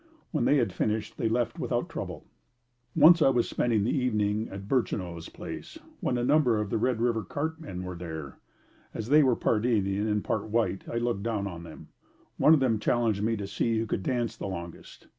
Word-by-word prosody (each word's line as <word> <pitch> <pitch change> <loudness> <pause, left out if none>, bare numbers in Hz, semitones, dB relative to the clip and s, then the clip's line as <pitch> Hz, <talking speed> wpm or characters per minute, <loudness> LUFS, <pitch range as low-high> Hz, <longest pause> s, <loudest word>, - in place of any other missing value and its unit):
When 155 - 0
they 145 - +4
had 115 -8 +1
finished, 110 0 -2
they 115 - +1
left 120 0 -1
without - - -1
trouble. - - -6 0.7
Once 165 +2 +7
I 135 - +6
was 125 -3 +2
spending 115 -4 +1
the 110 - +1
evening 110 -4 0
at 100 0 -8
Burchineau's 90 -9 -1
place - - -8 0.2
when 125 - 0
a 120 - -1
number 130 -4 +3
of 105 -2 -3
the - - +1
Red 125 0 +1
River 115 -2 +1
cart 160 - -4
men 90 - -6
were 90 0 -5
there. 80 -5 -7 0.6
As 110 +1 -4
they 150 +2 +7
were 130 -4 +4
part 110 -1 +1
Indian 105 -3 +1
and 105 -1 0
part 105 - -1
white, 110 -3 -1
I 115 - -2
looked 120 -4 -1
down 110 -2 -1
on 85 -4 -6
them. 85 -2 -11 0.5
One 160 - +6
of - - +2
them 120 -5 +2
challenged 110 -2 +1
me 115 +2 +1
to 100 - -4
see 110 +3 0
who 110 - 0
could 105 - -2
dance 120 +2 -1
the - - -5
longest. 85 -3 -8
110 Hz, 210 wpm, -28 LUFS, 100-125 Hz, 0.7 s, Once